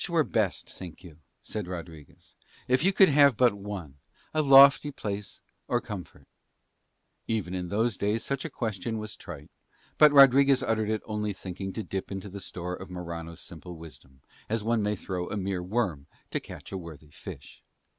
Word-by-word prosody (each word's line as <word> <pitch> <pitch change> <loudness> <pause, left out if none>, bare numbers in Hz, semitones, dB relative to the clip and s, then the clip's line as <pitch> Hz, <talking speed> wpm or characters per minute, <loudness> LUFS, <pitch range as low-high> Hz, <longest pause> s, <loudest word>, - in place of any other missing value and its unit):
"Which - - -1
were 165 -2 +3
best, 110 -8 -1
think 90 -1 -10
you," 80 -4 -13 0.2
said 105 -4 -4
Rodriguez, 85 -5 -9 0.3
"if 130 +3 +2
you 190 - +4
could 195 -2 +6
have 140 -4 +5
but 125 -4 +5
one, 100 -9 -7 0.3
a 155 - +2
lofty 140 +1 +8
place 105 -7 -6 0.3
or - - +1
comfort?" - - -9 1.0
Even 105 -5 -1
in 90 -1 -3
those 110 +1 0
days 105 +3 0
such 140 -1 -2
a 165 - -4
question 110 -3 -3
was 110 -1 -6
trite, - - -10 0.5
but 150 -1 +8
Rodriguez 135 -1 +7
uttered 110 -3 0
it 110 -1 -1
only 105 -1 -2
thinking 95 +1 -6
to 110 - -4
dip 95 +1 -5
in 95 - -3
the 100 0 -8
store 90 -1 -5
of 95 +1 -10
Morano's 85 -1 -6
simple 85 +1 -9
wisdom, 70 -5 -13 0.3
as 110 -1 -1
one 115 0 +1
may 105 0 0
throw 90 -2 -4
a 105 - -3
mere 95 -2 -2
worm 90 -7 -2 0.2
to - - 0
catch - - -11
a 95 - -4
worthy 80 -3 -11
fish. - - -11
100 Hz, 180 wpm, -28 LUFS, 90-120 Hz, 1.0 s, lofty